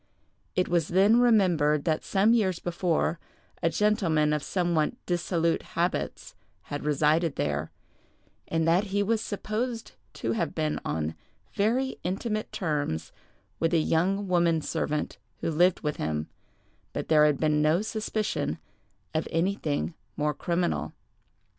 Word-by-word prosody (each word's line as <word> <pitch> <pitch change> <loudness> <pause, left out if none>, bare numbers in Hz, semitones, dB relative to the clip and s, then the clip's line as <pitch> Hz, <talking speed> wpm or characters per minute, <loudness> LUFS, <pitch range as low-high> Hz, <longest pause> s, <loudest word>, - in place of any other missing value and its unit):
It 180 - +2
was 170 -3 +1
then 200 +6 +5
remembered 175 -11 +3
that 155 -2 +1
some 205 +3 +3
years 190 -7 +2
before 175 -2 0 0.4
a 165 - +3
gentleman 165 -7 +2
of 150 - 0
somewhat 170 -2 0
dissolute 170 -1 0 0.2
habits 175 +2 -1 0.3
had 145 - -5
resided 150 +2 +2
there, 75 +2 -1 0.8
and 165 0 0
that 175 +5 +3
he 205 0 0
was 220 +1 +1
supposed 225 +3 -3 0.2
to - - -2
have 225 - -1
been 155 -1 -1
on 80 0 -2 0.4
very 245 +6 0
intimate 215 +4 -2
terms 145 - -2 0.5
with 165 +1 +2
a - - +5
young 185 +6 +1
woman 170 -2 +3
servant 150 0 -2 0.2
who - - -1
lived 175 +3 +3
with 150 -1 -2
him, 75 0 -2 0.7
but - - -3
there 150 -1 +6
had 145 -3 +1
been 150 -1 +2
no 155 +6 +3
suspicion 215 - -2 0.6
of 155 - -1
anything 165 -2 0 0.2
more 150 0 +1
criminal. 175 +3 -1
170 Hz, 135 wpm, -27 LUFS, 150-195 Hz, 0.8 s, there